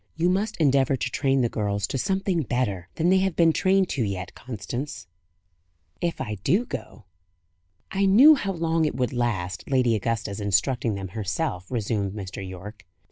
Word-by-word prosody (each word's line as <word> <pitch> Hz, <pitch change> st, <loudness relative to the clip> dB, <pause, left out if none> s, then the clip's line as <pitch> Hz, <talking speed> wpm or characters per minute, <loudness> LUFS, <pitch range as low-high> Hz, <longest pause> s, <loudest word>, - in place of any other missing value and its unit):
You 170 Hz, +2 st, +2 dB
must 205 Hz, +4 st, 0 dB
endeavour 135 Hz, -3 st, +3 dB
to 125 Hz, -1 st, -3 dB
train 135 Hz, -1 st, +1 dB
the 120 Hz, -, +3 dB
girls 100 Hz, -3 st, -1 dB
to 135 Hz, -, -3 dB
something 190 Hz, -1 st, 0 dB
better 105 Hz, -, -2 dB
than 165 Hz, +2 st, +1 dB
they 190 Hz, +1 st, +5 dB
have 190 Hz, -2 st, 0 dB
been 165 Hz, -2 st, +4 dB
trained 190 Hz, +2 st, +3 dB
to 130 Hz, -, -1 dB
yet, 95 Hz, -3 st, -4 dB
Constance." 120 Hz, 0 st, -6 dB, 1.0 s
"If 170 Hz, -1 st, -1 dB
I 105 Hz, -6 st, -4 dB
do 195 Hz, -, +2 dB
go." 120 Hz, -, -8 dB, 0.9 s
"I 195 Hz, 0 st, +2 dB
knew 255 Hz, +11 st, +8 dB
how 200 Hz, -9 st, -1 dB
long 165 Hz, -1 st, 0 dB
it 150 Hz, -, -1 dB
would 125 Hz, -1 st, -1 dB
last, 95 Hz, -7 st, -2 dB
Lady 130 Hz, -4 st, +3 dB
Augusta's 105 Hz, -1 st, -2 dB
instructing 105 Hz, +3 st, +1 dB
them 95 Hz, -1 st, -5 dB
herself," 100 Hz, -, -3 dB
resumed 105 Hz, -5 st, -1 dB
Mr. 95 Hz, -3 st, -7 dB
Yorke. 95 Hz, +3 st, -9 dB
125 Hz, 170 wpm, -25 LUFS, 105-165 Hz, 1.0 s, knew